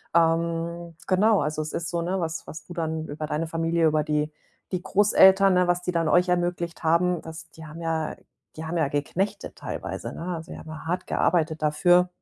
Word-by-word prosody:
ähm, 170 0 +1
genau, 205 +2 +4
also 155 +1 -1
es 155 - -5
ist 165 -2 -2
so, 170 0 -1
ne, 185 +3 -1
was 165 -1 -3
was 155 - -9
du 175 - -9
dann 160 -2 -2
über 150 +1 -5
deine 155 +2 -2
Familie, 165 0 +1
über 155 -1 +3
die 150 0 0 0.4
die 180 - -1
Großeltern, 195 -1 +5
ne, 180 0 +3
was 175 0 +1
die 180 - -1
dann 165 -2 +1
euch 180 +4 +4
ermöglicht 175 -1 -1
haben, 170 +2 +2
dass 160 0 -9
die 160 - -12
haben 155 +2 -10
ja 160 -1 -1
äh, - - -12 0.4
die 160 - -6
haben 165 +2 -2
ja 160 -4 +2
geknechtet 190 +9 -2
teilweise, - - -5
ne? - - -8 0.2
Also, 160 +2 -9
sie - - -8
haben 155 0 -9
hart 180 +2 -2
gearbeitet 160 -2 +1
dafür, 175 +4 +4
165 Hz, 205 wpm, -25 LUFS, 160-180 Hz, 0.4 s, Großeltern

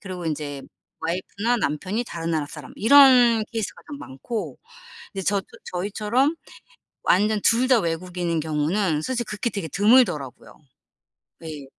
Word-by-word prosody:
그리고 185 -3 -7
인제 145 -3 -4 0.4
와이프나 200 +8 -1
남편이 195 +7 -2
다른 165 -5 -5
나라 155 -3 -1
사람 150 -3 -11
이런 245 -2 +6
케이스가 225 -2 -5
좀 285 -1 -7
많고, 150 - -6 0.6
이제 195 - -4
저 200 +1 +1
또 190 - -13 0.2
저희처럼 210 - 0 0.7
완전 210 +3 +3
둘 240 +3 +3
다 255 -4 +5
외국인인 170 -1 -2
경우는 155 +2 0
솔직히 240 +4 -2
극히 210 +3 -2
되게 200 -7 -5
드물더라고요. 190 - +2 0.9
네. 155 -4 -8
190 Hz, 305 characters per minute, -23 LUFS, 160-230 Hz, 0.9 s, 이런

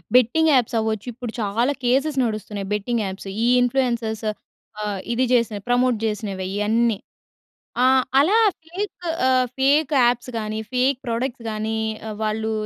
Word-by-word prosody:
Betting 255 +7 +4
apps 245 -2 +2
అవ్వచ్చు. 220 0 -2
ఇప్పుడు 240 -1 -6
చాలా 230 +7 +1
కేసెస్ 270 +4 +2
నడుస్తున్నాయి. 210 -3 -3
బెట్టింగ్ 220 +3 -1
యాప్స్ 195 +1 -6 0.2
ఈ - - +3 0.2
ఇన్‌ఫ్లుయెన్సర్స్ 235 -4 0 0.6
ఆహ్, 205 -2 -2
ఇది 255 +2 +2
చేసిన 230 -3 +2
ప్రమోట్ 245 -1 +3
జేసినవె 205 -3 -3
ఇయన్నీ. 220 +2 +1 0.9
ఆహ్, 260 0 +5 0.2
అలా 360 +10 +4 0.3
ఫేక్ 380 +5 -4 0.3
ఆహ్, 255 -1 +3
ఫేక్ 285 +3 +3
యాప్స్ 245 +1 0
గాని, 215 0 -3
ఫేక్ 255 +2 +2
ప్రొడక్ట్స్ 235 +1 -3
గాని, 215 +1 -2 0.3
ఆహ్, 215 - -5
వాళ్ళు 220 +1 -1
235 Hz, 135 wpm, -22 LUFS, 215-255 Hz, 0.9 s, ఆహ్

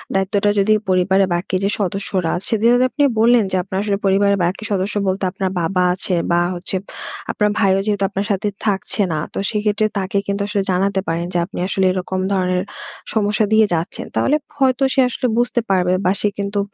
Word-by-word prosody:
দায়িত্বটা 195 +2 +1
যদি 205 +2 +3 0.2
পরিবারের 190 +1 +3
বাকি 185 +2 -2
যে 200 - +2
সদস্যরা 190 -2 -1
আছে, 195 - -4
যেহেতু 240 +2 +4
আপনি 290 - 0 0.2
বললেন 235 0 +5
যে, - - 0
আপনার 190 0 -5
আসলে 205 -1 0
পরিবারের 200 +1 +3
বাকি 185 +5 -2
সদস্য 195 +1 -1
বলতে 190 +1 -1
আপনার 190 0 -2
বাবা 180 +2 +1
আছে 185 +1 -3 0.2
বা, 170 0 +3
হচ্ছে 180 +2 -4 0.6
আপনার 210 - +1
ভাইও 195 -2 +3
যেহেতু 205 -2 0
আপনার 195 +1 -3
সাথে 200 +1 0 0.2
থাকছে 205 0 0
না। 155 - -1
তো - - -6
সেক্ষেত্রে, 210 0 0
তাকে 195 0 -1
কিন্তু 200 0 -1
আসলে 205 -1 0
জানাতে 195 +2 +1
পারেন 165 +1 -1
যে, 175 - +1
আপনি - - -7
আসলে 190 -1 +1
এরকম 185 0 -3
ধরনের 185 -1 0 0.5
সমস্যা 210 0 +1
দিয়ে 220 0 +6
যাচ্ছেন। 165 +1 -3
তাহলে 290 - +2 0.2
হয়তো 265 -1 +2
সে - - +1
আসলে 250 - -2
বুঝতে 240 0 +1
পারবে, 180 -2 +2
বা 180 - +4
সে - - +2
কিন্তু 200 0 -2
195 Hz, 190 wpm, -19 LUFS, 185-210 Hz, 0.6 s, দিয়ে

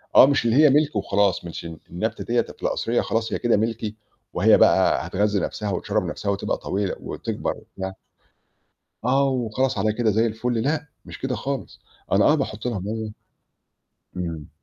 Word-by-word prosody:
آه - - +10
مش 140 -4 +2
اللي 115 +1 +3
هي 150 +1 +7
مِلك 145 0 +3
وخلاص، 100 -3 +1
مش 85 0 -7
الن 80 -1 -7
النبتة 110 +5 -3
ديّة 120 0 +2
ده - - -8
في - - -20
القصرية 115 +1 +1
خلاص 115 0 -1
هي - - -1
كده 120 -3 +3
مِلكي، 110 0 -2 0.4
وهي - - +5
بقى - - +4
هتغذّي 105 +1 +1
نفْسها 105 +1 -3
وتِشرَّب 105 +2 -1
نفْسها 100 +4 -2
وتبقى 100 - -1
طويلة 100 0 -2
وتكبَر - - -3
وبتاع 95 0 -7 1.1
آه، 135 +2 +3
وخلاص 125 -1 0
على 105 +2 +2
كده 110 0 +1
زي 110 +3 +2
الفل، 115 +1 -1
لأ، 150 +2 0 0.2
مش - - -9
كده 130 -1 -2
خالص. 140 -2 -5 0.3
أنا 100 +1 +5
آه 150 - +6
باحط 110 -6 -3
لها 120 -4 -1
مّيَّة 110 +3 -4 1.0
إمم. 85 -4 -4
110 Hz, 175 wpm, -24 LUFS, 100-125 Hz, 1.1 s, آه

